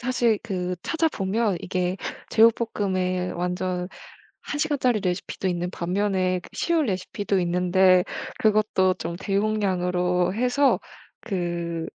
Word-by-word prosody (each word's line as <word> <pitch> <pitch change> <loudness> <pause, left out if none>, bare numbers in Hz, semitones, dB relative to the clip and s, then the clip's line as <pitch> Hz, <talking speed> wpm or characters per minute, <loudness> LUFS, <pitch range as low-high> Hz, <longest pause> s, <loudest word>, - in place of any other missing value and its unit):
사실 240 -3 +1
그 180 -4 -3
찾아보면 220 - 0
이게 180 0 -1 0.3
제육볶음에 195 -5 +2
완전 180 +1 -2 0.5
1 290 - -4
시간짜리 255 -7 +1
레시피도 185 +1 -2
있는 175 0 -2
반면에 185 0 0
그 - - -14
쉬운 330 -5 +1
레시피도 195 0 -1
있는데 180 +1 +4 0.3
그것도 210 -3 +3
좀 170 -1 -5
대용량으로 185 -3 0
해서 250 +5 +3 0.4
그 170 -5 -3
185 Hz, 255 characters per minute, -25 LUFS, 180-215 Hz, 0.5 s, 있는데